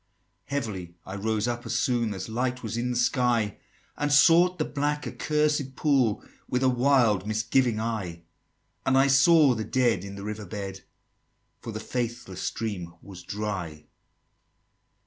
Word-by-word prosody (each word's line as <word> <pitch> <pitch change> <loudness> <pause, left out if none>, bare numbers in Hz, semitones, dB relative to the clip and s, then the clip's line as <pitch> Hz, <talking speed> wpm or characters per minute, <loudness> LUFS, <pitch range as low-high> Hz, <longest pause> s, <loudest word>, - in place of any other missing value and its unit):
XXVIII. - - -46
"Heavily 100 -11 -4
I 95 - -6
rose 110 +2 -1
up, 120 0 -3
as - - -2
soon 115 -4 0
As 95 - -5
light 125 +2 -2
was 110 0 -4
in 120 +1 -1
the 125 - -2
sky, 120 -4 +1 0.4
And 145 0 -1
sought 170 +5 +6
the 155 - 0
black 145 +1 -2
accursed 150 -3 0
pool 130 -7 +2 0.3
With 125 +1 0
a 130 - +5
wild 120 -6 +3
misgiving 110 +2 +1
eye; 100 -7 -4 0.6
And 130 0 +2
I 135 - +6
saw 140 +1 +6
the 110 -2 -3
Dead 120 -6 +1
in 100 0 -7
the 100 - -8
river 105 -1 -5
bed, 95 0 -6 0.8
For 115 - -7
the 110 - -5
faithless 120 -5 -4
stream 90 -7 -4
was 95 -3 -10
dry." 90 -8 -5
115 Hz, 155 wpm, -27 LUFS, 105-130 Hz, 0.8 s, sought